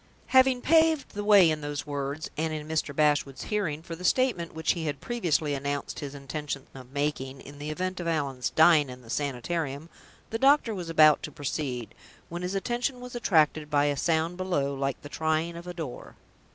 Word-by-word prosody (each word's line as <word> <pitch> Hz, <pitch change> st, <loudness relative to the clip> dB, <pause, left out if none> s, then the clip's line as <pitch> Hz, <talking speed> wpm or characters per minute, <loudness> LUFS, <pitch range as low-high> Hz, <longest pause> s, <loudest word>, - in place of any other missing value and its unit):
Having 260 Hz, -1 st, +5 dB
paved 320 Hz, -2 st, +4 dB
the 205 Hz, -, -5 dB
way 200 Hz, -5 st, +7 dB
in 155 Hz, -1 st, -2 dB
those 145 Hz, 0 st, -4 dB
words 145 Hz, +1 st, -4 dB
(and 160 Hz, +1 st, -1 dB
in 155 Hz, -1 st, -5 dB
Mr. 155 Hz, -2 st, -1 dB
Bashwood's 145 Hz, -3 st, +1 dB
hearing) 165 Hz, -8 st, -2 dB
for 165 Hz, -1 st, -6 dB
the 180 Hz, -, -11 dB
statement 205 Hz, -6 st, +1 dB
which 160 Hz, -1 st, +1 dB
he 165 Hz, -3 st, -3 dB
had 145 Hz, -2 st, -3 dB
previously 170 Hz, -11 st, 0 dB
announced 140 Hz, +1 st, -3 dB
his 145 Hz, -1 st, -6 dB
intention 140 Hz, 0 st, -5 dB
of 130 Hz, -1 st, -12 dB
making, 140 Hz, -2 st, -2 dB
in 145 Hz, +2 st, -12 dB
the 150 Hz, +1 st, -5 dB
event 185 Hz, +4 st, -3 dB
of 175 Hz, -, -4 dB
Allan's 140 Hz, -6 st, -1 dB
dying 160 Hz, -3 st, +5 dB
in 125 Hz, 0 st, -10 dB
the 115 Hz, -, -10 dB
Sanitarium, 145 Hz, +2 st, -3 dB, 0.4 s
the 225 Hz, -, -2 dB
doctor 270 Hz, -3 st, +4 dB
was 180 Hz, -4 st, -5 dB
about 155 Hz, -2 st, +6 dB
to 150 Hz, -, -6 dB
proceed, 130 Hz, -6 st, -4 dB, 0.4 s
when 175 Hz, +1 st, -5 dB
his 180 Hz, +2 st, -3 dB
attention 245 Hz, +5 st, -1 dB
was 250 Hz, 0 st, -9 dB
attracted 155 Hz, -9 st, +2 dB
by 145 Hz, -1 st, +3 dB
a 145 Hz, -1 st, +1 dB
sound 165 Hz, +4 st, 0 dB
below 175 Hz, -7 st, -1 dB
like 135 Hz, 0 st, -2 dB
the -, -, -7 dB
trying 160 Hz, +2 st, -1 dB
of 170 Hz, +1 st, -9 dB
a 180 Hz, -, -5 dB
door. 155 Hz, -7 st, -7 dB
155 Hz, 195 wpm, -28 LUFS, 145-180 Hz, 0.4 s, way